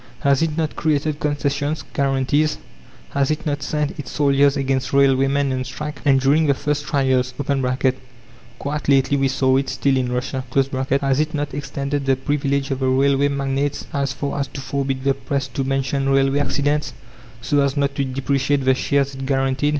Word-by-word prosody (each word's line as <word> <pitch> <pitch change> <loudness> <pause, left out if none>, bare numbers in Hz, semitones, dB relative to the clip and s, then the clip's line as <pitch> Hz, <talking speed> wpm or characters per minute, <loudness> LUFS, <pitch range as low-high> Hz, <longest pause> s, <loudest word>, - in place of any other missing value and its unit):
Has 140 0 +3
it 160 -1 0
not 160 -2 -1
created 155 -1 0
concessions, 145 +1 -1
guarantees? 140 +2 +1 0.5
Has 140 -1 +1
it 155 - -2
not 145 -1 -1
sent 150 +2 -2
its 145 - -6
soldiers 140 -1 +3
against 135 -1 -1
railwaymen 135 0 +3
on 130 0 -2
strike? 150 +3 -6
And 135 -2 +4
during 145 +4 +3
the 140 - +3
first 145 +1 -2
trials 130 -3 +1 1.2
(quite 145 0 -3
lately 140 0 +4
we 135 -1 +2
saw 130 0 +2
it 135 - -1
still 135 +1 +1
in 125 -1 0
Russia), 130 +1 -2 0.6
has 135 0 +2
it 155 +1 0
not 145 -1 -3
extended 140 0 -3
the 135 - +4
privilege 140 0 -1
of 135 - -1
the 130 - 0
railway 135 +2 +3
magnates 140 0 -2
as 140 -2 0
far 140 +2 -3
as 140 - -1
to 135 - -8
forbid 135 0 -2
the 135 0 +3
Press 140 0 -3
to 135 - -2
mention 135 0 -1
railway 135 +1 +3
accidents, 145 0 0 0.5
so 140 +5 +1
as 140 +1 0
not 140 -1 +1
to 140 - -1
depreciate 135 +1 0
the 130 - +5
shares 140 +1 0
it 135 0 -6
guaranteed? 135 +1 +1
140 Hz, 180 wpm, -21 LUFS, 135-145 Hz, 1.2 s, the